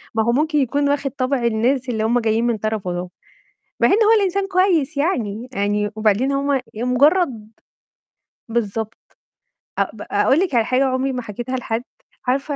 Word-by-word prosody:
ما 220 Hz, -, +2 dB
هو 235 Hz, -, +2 dB
ممكن 300 Hz, +4 st, +1 dB
يكون 280 Hz, +2 st, +1 dB
واخد 280 Hz, -1 st, 0 dB
طَبْع 260 Hz, -1 st, -1 dB
الناس 245 Hz, +3 st, +1 dB
اللي 220 Hz, -2 st, -1 dB
هُم 235 Hz, +2 st, +2 dB
جايين 225 Hz, 0 st, +1 dB
من 235 Hz, -2 st, 0 dB
طرفُه 215 Hz, -4 st, -2 dB
دُول، 175 Hz, +1 st, -4 dB, 0.7 s
مع -, -, +5 dB
إن -, -, +3 dB
هو 430 Hz, -, +5 dB
الإنسان 390 Hz, 0 st, 0 dB
كويس 360 Hz, -6 st, +1 dB
يعني، 245 Hz, -, -1 dB
يعني 205 Hz, 0 st, 0 dB
وبعدين 220 Hz, +5 st, +2 dB
هو 280 Hz, +1 st, 0 dB, 0.2 s
ي 220 Hz, -, -5 dB
مجرّد 250 Hz, -, +2 dB, 1.0 s
بالضبط 225 Hz, -1 st, -4 dB, 0.6 s
أ -, -, +5 dB
ب -, -, -11 dB
أقول 275 Hz, -, +3 dB
لِك 360 Hz, -7 st, 0 dB
على 230 Hz, -2 st, +3 dB
حاجة 255 Hz, +3 st, +2 dB
عُمري 265 Hz, +1 st, 0 dB
ما 250 Hz, -, -3 dB
حكيتها 240 Hz, +3 st, -5 dB
لحد، 230 Hz, -1 st, -3 dB, 0.4 s
عارفة 275 Hz, +3 st, 0 dB
250 Hz, 170 wpm, -20 LUFS, 220-280 Hz, 1.0 s, مع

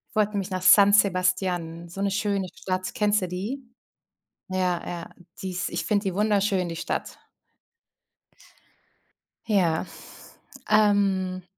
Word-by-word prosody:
Wollte 210 Hz, -1 st, +2 dB
nämlich 200 Hz, -2 st, -3 dB
nach 185 Hz, -1 st, -3 dB
San 200 Hz, +2 st, +7 dB
Sebastian, 180 Hz, -4 st, +1 dB
so 175 Hz, +3 st, -7 dB
'ne 200 Hz, -, +1 dB
schöne 200 Hz, -1 st, -1 dB
Stadt. 185 Hz, 0 st, -4 dB
Kennst 210 Hz, -1 st, +2 dB
du 185 Hz, -, -2 dB
die? 200 Hz, +10 st, -4 dB, 0.9 s
Ja, 185 Hz, -2 st, -1 dB
ja, 170 Hz, -1 st, -6 dB, 0.3 s
die 190 Hz, -, -3 dB
ist 180 Hz, -, -2 dB
ich 170 Hz, -, -3 dB
finde 210 Hz, -1 st, +1 dB
die 190 Hz, -2 st, -2 dB
wunderschön, 200 Hz, -3 st, +1 dB
die 165 Hz, -, -5 dB
Stadt. -, -, -4 dB, 2.3 s
Ja, 180 Hz, -7 st, +1 dB, 0.8 s
ähm 200 Hz, -3 st, +2 dB
190 Hz, 125 wpm, -25 LUFS, 180-205 Hz, 2.3 s, San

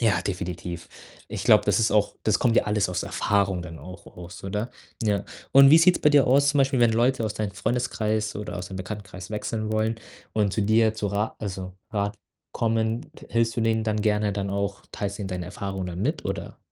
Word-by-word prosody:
Ja, 105 Hz, -7 st, +3 dB
definitiv. 90 Hz, -2 st, -5 dB, 0.4 s
Ich -, -, -5 dB
glaube, -, -, +6 dB
das -, -, +2 dB
ist 115 Hz, -1 st, +2 dB
auch 105 Hz, -1 st, +2 dB
das 105 Hz, -2 st, +2 dB
kommt 120 Hz, -2 st, +3 dB
ja -, -, +4 dB
alles 105 Hz, -2 st, +1 dB
aus 90 Hz, -1 st, -2 dB
Erfahrung 100 Hz, -3 st, 0 dB
dann 80 Hz, -2 st, -9 dB
auch 90 Hz, +6 st, -11 dB
aus, 90 Hz, +1 st, -10 dB
oder? 105 Hz, +5 st, -3 dB, 0.3 s
Ja. 105 Hz, -3 st, 0 dB, 0.3 s
Und 135 Hz, 0 st, +8 dB
wie 160 Hz, -, +9 dB
sieht's 180 Hz, +2 st, +5 dB
bei 150 Hz, -, +5 dB
dir 145 Hz, -2 st, +5 dB
aus 140 Hz, +3 st, +4 dB
zum 145 Hz, 0 st, +2 dB
Beispiel, 135 Hz, -1 st, +2 dB
wenn 120 Hz, -1 st, +5 dB
Leute 120 Hz, +2 st, +2 dB
aus 105 Hz, -1 st, -2 dB
deinem 105 Hz, -2 st, -3 dB
Freundeskreis 110 Hz, -2 st, -1 dB
oder 105 Hz, -3 st, -5 dB
aus 90 Hz, 0 st, -5 dB
deinem 95 Hz, -, -6 dB
Bekanntenkreis 95 Hz, 0 st, -7 dB
wechseln 110 Hz, 0 st, -3 dB
wollen 110 Hz, +1 st, 0 dB, 0.3 s
und 105 Hz, -3 st, +1 dB
zu 105 Hz, -, 0 dB
dir 110 Hz, +1 st, +3 dB
zu 110 Hz, -2 st, -2 dB
Ra 105 Hz, +2 st, -2 dB
also, 95 Hz, -3 st, -5 dB, 0.2 s
Rat 100 Hz, -1 st, -2 dB, 0.3 s
kommen, 115 Hz, +1 st, 0 dB
t -, -, -14 dB
hilfst 115 Hz, -1 st, +1 dB
du -, -, +1 dB
denen 110 Hz, -1 st, +1 dB
dann 110 Hz, -1 st, 0 dB
gerne 105 Hz, -1 st, +1 dB
dann 100 Hz, 0 st, -3 dB
auch, 100 Hz, 0 st, -2 dB
teilst 100 Hz, -1 st, -4 dB
denen 100 Hz, -2 st, -4 dB
deine 90 Hz, -2 st, -4 dB
Erfahrungen 95 Hz, -2 st, -4 dB
dann 90 Hz, +1 st, -4 dB
mit, 150 Hz, +8 st, -1 dB
oder? -, -, -4 dB
105 Hz, 215 wpm, -25 LUFS, 95-115 Hz, 0.4 s, wie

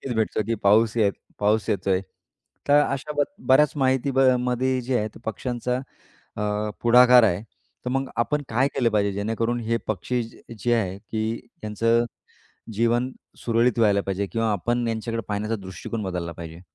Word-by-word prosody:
भेटते 110 Hz, -1 st, 0 dB
की 115 Hz, 0 st, 0 dB
पाऊसही 110 Hz, +1 st, +4 dB, 0.3 s
पाऊस 105 Hz, +1 st, +1 dB
येतोय. 95 Hz, -1 st, +1 dB, 0.7 s
तर 145 Hz, +1 st, +6 dB
अशा 140 Hz, +2 st, -3 dB
ब 145 Hz, -, +5 dB, 0.2 s
बऱ्याच 140 Hz, +2 st, +5 dB
माहिती 130 Hz, 0 st, +1 dB
म 135 Hz, -, +3 dB, 0.2 s
मध्ये 125 Hz, +1 st, 0 dB
जे 125 Hz, 0 st, 0 dB
आहे 105 Hz, -, -1 dB
ते -, -, -11 dB
पक्ष्यांचा 125 Hz, +3 st, -2 dB, 0.6 s
अ, 105 Hz, 0 st, -1 dB
पुढाकार 125 Hz, 0 st, +7 dB
आहे. 100 Hz, -2 st, +2 dB, 0.4 s
तर -, -, -1 dB
मग 135 Hz, 0 st, -1 dB
आपण 145 Hz, +5 st, +1 dB
काय 125 Hz, +5 st, +2 dB
केलं 120 Hz, -3 st, +2 dB
पाहिजे, 100 Hz, -1 st, +2 dB
जेणेकरून 115 Hz, +4 st, -1 dB
हे 115 Hz, +1 st, 0 dB
पक्षी, 120 Hz, +4 st, -1 dB, 0.4 s
जे 120 Hz, +5 st, +1 dB
आहे 95 Hz, -4 st, -1 dB
की 110 Hz, +1 st, -3 dB, 0.3 s
यांचं 115 Hz, +3 st, +2 dB, 0.7 s
जीवन 120 Hz, +4 st, +1 dB, 0.3 s
सुरळीत 115 Hz, 0 st, +2 dB
व्हायला 100 Hz, -3 st, +4 dB
पाहिजे 100 Hz, 0 st, -2 dB
किंवा 115 Hz, +1 st, 0 dB
आपण 120 Hz, +4 st, 0 dB
यांच्याकडे 115 Hz, 0 st, -2 dB
पाहण्याचा 105 Hz, +2 st, -1 dB
दृष्टिकोन 95 Hz, +4 st, -6 dB
बदलला 90 Hz, -2 st, -3 dB
पाहिजे? 85 Hz, +1 st, -9 dB
115 Hz, 155 wpm, -24 LUFS, 105-125 Hz, 0.7 s, पुढाकार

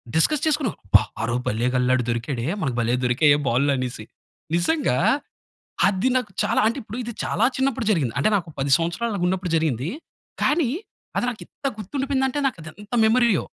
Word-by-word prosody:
Discuss 290 Hz, -, +2 dB
చేసుకున్నాం. 295 Hz, -, 0 dB
"అబ్బా! 100 Hz, +1 st, +6 dB, 0.2 s
ఆరోజు, 120 Hz, +2 st, -1 dB
భళ్ళేగ 120 Hz, +4 st, 0 dB
అల్లా, 125 Hz, 0 st, +2 dB
ఆడు 125 Hz, -, -1 dB
దొరికాడే! 120 Hz, +1 st, -2 dB, 0.2 s
మనకు 130 Hz, -5 st, -1 dB
భలే 120 Hz, +1 st, +1 dB
దొరికాయే! 145 Hz, +4 st, +4 dB
బాల్లు." 135 Hz, +5 st, +2 dB
అనేసి. 125 Hz, -4 st, -4 dB, 0.5 s
నిజంగా 175 Hz, -, +1 dB, 0.9 s
అది 195 Hz, +5 st, +2 dB
నాకు 250 Hz, -5 st, -1 dB
చాలా, -, -, +2 dB
అంటే 230 Hz, +5 st, 0 dB
ఇప్పుడు 220 Hz, +2 st, -7 dB
ఇది, 235 Hz, 0 st, -5 dB
చాలా 220 Hz, -, +1 dB
చిన్నప్పుడు 265 Hz, -4 st, 0 dB
జరిగింది. 145 Hz, -, +1 dB
అంటే 140 Hz, -, +3 dB
నాకు 175 Hz, -3 st, -3 dB
10 135 Hz, +1 st, -1 dB
సంవత్సరాలు 170 Hz, +8 st, -2 dB
అలాగ 185 Hz, -3 st, -1 dB
ఉన్నప్పుడు 185 Hz, -1 st, -2 dB
జరిగింది. 150 Hz, -4 st, 0 dB, 0.5 s
కానీ 300 Hz, -3 st, +2 dB, 0.5 s
అది -, -, +1 dB
నాకు 235 Hz, -, -9 dB
ఇంత -, -, -8 dB
గుర్తుండిపోయింది 265 Hz, +5 st, -1 dB
అంటే, 265 Hz, -, -3 dB
నాకు 255 Hz, -9 st, -2 dB
అది 155 Hz, -, -8 dB
ఎంత 210 Hz, +3 st, -7 dB
మెమరీయో! 225 Hz, -4 st, +3 dB
175 Hz, 175 wpm, -23 LUFS, -, 0.9 s, అబ్బా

